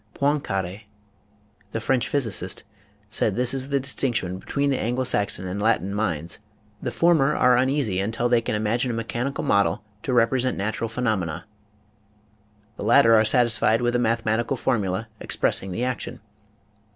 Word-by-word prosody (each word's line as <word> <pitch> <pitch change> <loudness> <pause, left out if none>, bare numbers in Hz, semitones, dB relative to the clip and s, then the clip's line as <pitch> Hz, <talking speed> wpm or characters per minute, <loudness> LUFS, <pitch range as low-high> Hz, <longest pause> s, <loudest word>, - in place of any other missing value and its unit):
Poincare, 110 -9 -1 0.9
the 115 - -1
French 125 +2 0
physicist, 110 -10 +1 0.5
said 110 -3 +1
this 125 +1 +3
is 135 0 -1
the 140 -1 +1
distinction 120 -8 -2
between 140 +7 -1
the 135 - 0
Anglo 125 +3 -1
Saxon 100 -6 0
and 95 +3 -4
Latin 100 -3 +1
minds; 85 -6 -2 0.4
the - - -2
former 155 -4 +3
are 125 0 +4
uneasy 130 -6 +1
until 110 +4 -1
they 120 -1 +3
can 110 - -2
imagine 110 +4 0
a 120 - -2
mechanical 120 +4 -3
model 100 0 +1 0.2
to 130 - -3
represent 125 +1 +2
natu 105 +3 -3
ral 115 - 0
phenomena, 110 -9 -2 1.3
the - - -6
latter 115 +2 +5
are 110 -1 +6
satisfied 115 0 +3
with 120 0 +1
a - - +2
mathe 115 -1 0
matical 115 +4 0
formula 110 -4 -1
expressing 95 - -1
the 115 +7 -3
action. 125 -3 -4
115 Hz, 155 wpm, -24 LUFS, 105-130 Hz, 1.3 s, are